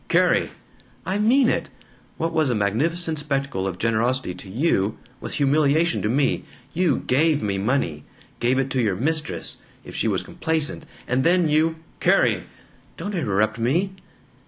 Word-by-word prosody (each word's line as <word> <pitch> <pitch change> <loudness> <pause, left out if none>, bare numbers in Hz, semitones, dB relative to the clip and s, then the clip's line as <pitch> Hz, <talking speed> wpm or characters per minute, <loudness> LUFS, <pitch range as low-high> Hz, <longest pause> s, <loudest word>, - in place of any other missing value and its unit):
"Carrie!" - - +3 0.6
"I 190 +2 -1
mean 245 +5 +4
it! - - 0 0.5
What 165 +1 -2
was 155 -4 +2
a 120 - +1
magnificent 155 - 0
spectacle 140 -9 -2
of 90 -2 -4
generosity 115 -1 0
to 90 +2 -10
you 110 - +1 0.2
was - - -5
humiliation 150 +3 +2
to 105 - 0
me. 135 +3 +1 0.3
You 180 +1 +1
GAVE 150 +2 +2
me 100 -2 -1
money 95 - -1 0.4
gave 125 +2 +2
it 135 0 0
to 130 - +1
your 105 -5 +1
mistress, 150 - -2 0.3
if - - -10
she - - 0
was 95 -4 0
complaisant, 160 - -2 0.2
and 125 +2 +1
then 175 +1 +3
you 160 +2 +2
" - - -31
"Carrie!" - - +3 0.5
"(Don't 205 +5 -5
interrupt 110 - 0
me!) 170 +12 +1
140 Hz, 160 wpm, -23 LUFS, 110-160 Hz, 0.6 s, mean